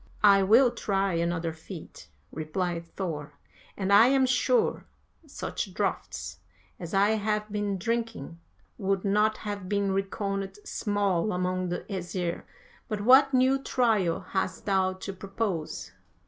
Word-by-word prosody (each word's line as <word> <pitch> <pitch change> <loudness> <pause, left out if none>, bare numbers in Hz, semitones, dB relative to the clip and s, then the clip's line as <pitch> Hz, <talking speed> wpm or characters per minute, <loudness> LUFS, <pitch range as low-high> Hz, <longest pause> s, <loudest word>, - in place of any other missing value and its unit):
"'I 200 -1 +7
will 240 +3 +6
try 195 -5 0
another 170 -1 -1
feat,' 160 +1 -11 0.2
replied 170 +2 -3
Thor, 150 -6 -4 0.4
'and 195 0 +1
I 220 +4 +8
am 265 0 +4
sure 350 - +1 0.4
such 200 -8 -5
draughts 75 - -3 0.4
as 170 +1 -5
I 200 +2 +4
have 210 -1 -1
been 205 -1 -1
drinking 225 -6 -3 0.4
would 195 0 0
not 210 +2 +2
have 200 -3 -4
been 200 -1 +1
reckoned 195 0 -2
small 205 -2 0
among 180 0 -1
the 175 - -2
Æsir; 180 -3 -4 0.5
but 215 -3 -3
what 265 +5 +6
new 260 +1 +3
trial 220 -11 +1
hast 190 -1 -3
thou 190 -2 +2
to 190 +1 -7
propose?' 195 -4 -4
195 Hz, 130 wpm, -28 LUFS, 180-215 Hz, 0.5 s, I